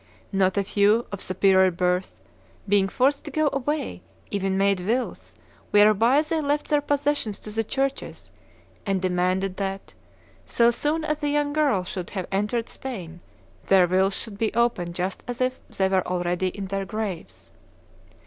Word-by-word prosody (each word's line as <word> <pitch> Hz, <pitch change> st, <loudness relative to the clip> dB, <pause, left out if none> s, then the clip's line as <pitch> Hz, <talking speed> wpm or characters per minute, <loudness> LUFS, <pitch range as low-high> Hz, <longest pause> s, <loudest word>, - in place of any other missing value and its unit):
Not 190 Hz, -1 st, +2 dB
a 200 Hz, -, +2 dB
few, 205 Hz, +4 st, +3 dB
of 200 Hz, -, -5 dB
superior 190 Hz, 0 st, +3 dB
birth, 180 Hz, +1 st, -1 dB, 0.5 s
being 200 Hz, -1 st, +3 dB
forced 275 Hz, +7 st, +1 dB
to -, -, -5 dB
go 295 Hz, 0 st, +1 dB
away, 290 Hz, +3 st, -2 dB, 0.3 s
even 195 Hz, -1 st, -1 dB
made 195 Hz, -1 st, +2 dB
wills 230 Hz, +8 st, -3 dB, 0.3 s
whereby 215 Hz, +7 st, +5 dB
they 320 Hz, 0 st, -1 dB
left 290 Hz, 0 st, -1 dB
their 295 Hz, -1 st, +3 dB
possessions 285 Hz, -7 st, -1 dB
to 215 Hz, -, -9 dB
the 225 Hz, +1 st, -1 dB
churches, 270 Hz, +4 st, -3 dB, 0.5 s
and 195 Hz, -2 st, 0 dB
demanded 185 Hz, +1 st, 0 dB
that, 195 Hz, -1 st, -4 dB, 0.5 s
so 235 Hz, 0 st, +3 dB
soon 300 Hz, +6 st, -1 dB
as 305 Hz, -1 st, -1 dB
the 295 Hz, -1 st, -1 dB
young 290 Hz, 0 st, 0 dB
girl 285 Hz, -11 st, +2 dB
should 180 Hz, -1 st, -6 dB
have 190 Hz, -3 st, -4 dB
entered 210 Hz, +4 st, -1 dB
Spain, 180 Hz, -10 st, -7 dB, 0.5 s
their 190 Hz, -2 st, +6 dB
wills 190 Hz, +2 st, +2 dB
should 205 Hz, -3 st, -6 dB
be 225 Hz, -, +1 dB
opened 210 Hz, -8 st, 0 dB
just 185 Hz, +1 st, -3 dB
as 245 Hz, -1 st, -5 dB
if 255 Hz, 0 st, 0 dB
they 190 Hz, -, 0 dB
were 190 Hz, -1 st, +1 dB
already 180 Hz, 0 st, -1 dB
in 195 Hz, +2 st, -5 dB
their 195 Hz, +1 st, -2 dB
graves. 175 Hz, -, -6 dB
200 Hz, 160 wpm, -25 LUFS, 185-260 Hz, 0.5 s, their